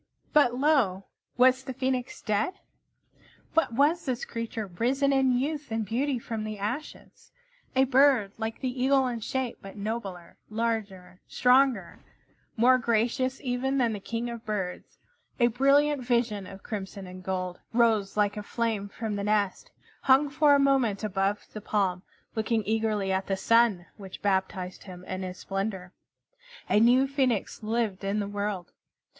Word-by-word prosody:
But 265 -5 +4
lo! 255 -9 +2 0.3
Was 255 +1 +5
the 260 -2 -5
Phoenix 260 -1 -2
dead? 215 - 0 1.0
What 325 -7 +2
was 295 +7 +2
this 255 -3 -2
creature 230 -1 -4
risen 255 +9 0
in 265 -2 +3
youth 295 +3 -2
and 225 -1 -2
beauty 255 +6 0
from 225 -2 -5
the 215 -1 -5
ashes? 245 +10 -6 0.4
A 260 - +5
bird 265 -5 +4
like 225 0 -4
the 255 -1 -2
Eagle 270 0 +4
in 245 -2 -2
shape, 255 +2 -3
but 195 +1 -10
nobler, 200 -5 -5
larger, 215 -5 -3
stronger, 250 -6 +3 0.6
more 255 +3 +5
gracious 240 +3 0
even 265 0 -1
than 240 -4 +2
the 205 - -4
King 230 +4 -4
of 235 -1 -8
Birds, 195 -4 -4 0.4
a 240 - +5
brilliant 280 +2 +3
vision 235 -5 0
of 195 +1 -11
crimson 195 -2 -6
and 185 0 -10
gold, 185 -1 -3
rose 225 -4 +2
like 205 0 +2
a 210 - -4
flame 215 -2 -2
from 215 0 -4
the 200 - -3
nest, 205 -2 0 0.3
hung 275 +2 +4
for 295 -1 +5
a - - +3
moment 265 -7 +2
above 195 0 -1
the 215 - -6
palm, 195 -4 0 0.3
looking 220 0 0
eagerly 215 -2 0
at 190 0 -1
the 195 - 0
Sun, 230 -4 +3
which 195 -3 -10
baptized 190 -2 -1
him 180 -2 -10
in 185 0 -4
its 180 -1 -6
splendor. 195 -2 -4 0.7
A - - +4
new 245 +4 +5
Phoenix 265 -7 -1
lived 215 -3 -1
in 200 +2 0
the 200 - -2
world. 205 -3 -3
225 Hz, 155 wpm, -28 LUFS, 200-255 Hz, 1.0 s, Was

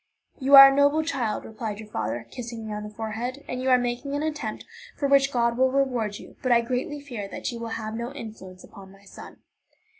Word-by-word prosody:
"You 275 +1 +5
are 275 0 +12
a - - -2
noble 285 +2 +3
child," 255 -9 -2
replied 220 -2 -6
your 220 - -9
father, 115 - -4
kissing 235 -2 -7
me 215 - -5
on 210 - -4
the 210 - -7
forehead, 225 +5 -5
"and 250 0 -4
you 260 - 0
are 255 - +6
making 245 +3 -3
an 290 - -2
attempt 310 -1 -4 0.3
for 280 - 0
which 275 0 +4
God 235 -1 +1
will 260 0 +4
reward 250 -6 0
you; - - -14
but 255 - 0
I 235 -1 +5
greatly 255 +6 -3
fear 240 -8 -7
that - - -5
you 235 - -7
will 230 - -5
have 215 -1 -5
no 235 +3 -4
influence 210 -8 -10
upon 195 -1 -13
my 195 +1 -19
son." 200 - -13
240 Hz, 230 wpm, -25 LUFS, 215-275 Hz, 0.3 s, are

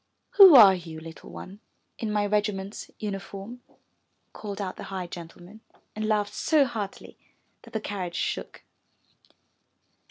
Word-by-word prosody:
*'Who 385 -6 +9
are 210 -6 +10
you, 165 -3 -7
little 160 0 -11
one, 195 +2 -10 0.4
in 220 -2 -2
my 210 -1 +1
regiment's 205 -1 -2
uniform?'' 200 +3 -7 0.7
called 205 -2 -7
out 190 -2 -4
the - - -8
high 190 -2 -5
gentleman 175 +4 -11 0.3
and 215 0 -2
laughed 210 -1 0
so 300 -3 +3
heartily 210 -5 -6 0.4
that - - -16
the 220 - -1
carriage 185 -5 -5
shook. - - -4
205 Hz, 130 wpm, -26 LUFS, 185-215 Hz, 0.7 s, are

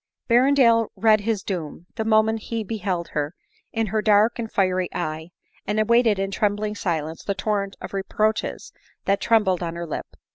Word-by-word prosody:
Berrendale 240 -2 +4
read 215 +2 +4
his 215 -2 -1
doom, 170 -3 -5
the 220 - -2
moment 220 0 +3
he 230 -1 -2
beheld 185 -5 -3
her, 150 +2 -3 0.4
in 225 0 0
her 215 +1 -1
dark 215 +3 +3
and 225 -2 -4
fiery 185 -2 +1
eye, 160 -1 -3 0.4
and 210 +1 0
awaited 230 -1 +4
in 195 0 -2
trembling 210 +1 0
silence 165 -5 -3
the 200 - -2
torrent 200 0 -1
of - - -8
reproaches 215 +3 -1 0.3
that 195 0 +1
trembled 210 -6 +2
on 170 -1 -3
her 170 0 -4
lip. 155 - -5
205 Hz, 170 wpm, -23 LUFS, 185-220 Hz, 0.4 s, Berrendale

